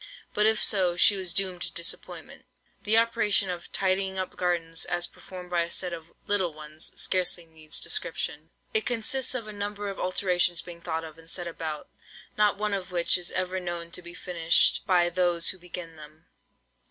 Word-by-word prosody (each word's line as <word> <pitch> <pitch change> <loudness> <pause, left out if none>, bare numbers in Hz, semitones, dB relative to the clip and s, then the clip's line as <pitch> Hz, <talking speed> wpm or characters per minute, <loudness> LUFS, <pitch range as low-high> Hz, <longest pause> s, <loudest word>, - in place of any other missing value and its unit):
But 210 +1 +4
if 220 0 +4
so, 180 -4 +2
she 200 - +7
was 185 -2 -1
doomed 185 0 +1
to - - -3
disappointment. 170 - -4 0.4
The 215 +2 +5
operation 215 -4 +2
of 175 -1 -7
"tidying 190 0 0
up 185 -1 -3
gardens," 165 -2 0
as 175 0 0
performed 180 -1 -11
by 175 -1 +2
a 170 - -2
set 180 0 +1
of 165 0 -8
"little 190 -6 0
ones," 155 +1 -7
scarcely 180 -2 +1
needs 160 -1 -5
description. - - -1 0.2
It 440 - +3
consists 250 +2 +1
of 230 -4 -3
a 215 - -7
number 205 0 -4
of 195 - -6
alterations 180 -2 +2
being 170 -1 -10
thought 165 -1 -3
of, 160 0 -10
and 165 0 -7
set 175 0 -1
about, 160 -3 -5 0.5
not 210 -1 +3
one 210 0 -1
of 185 -2 -3
which 175 -1 +3
is 180 -1 -2
ever 185 0 -1
known 175 -1 -5
to 180 - 0
be 175 0 -10
finished 170 +2 +3
by 175 -3 +4
those 175 -1 +3
who 185 - -4
begin 170 -2 -8
them. 155 +1 -14
180 Hz, 190 wpm, -27 LUFS, 170-195 Hz, 0.5 s, she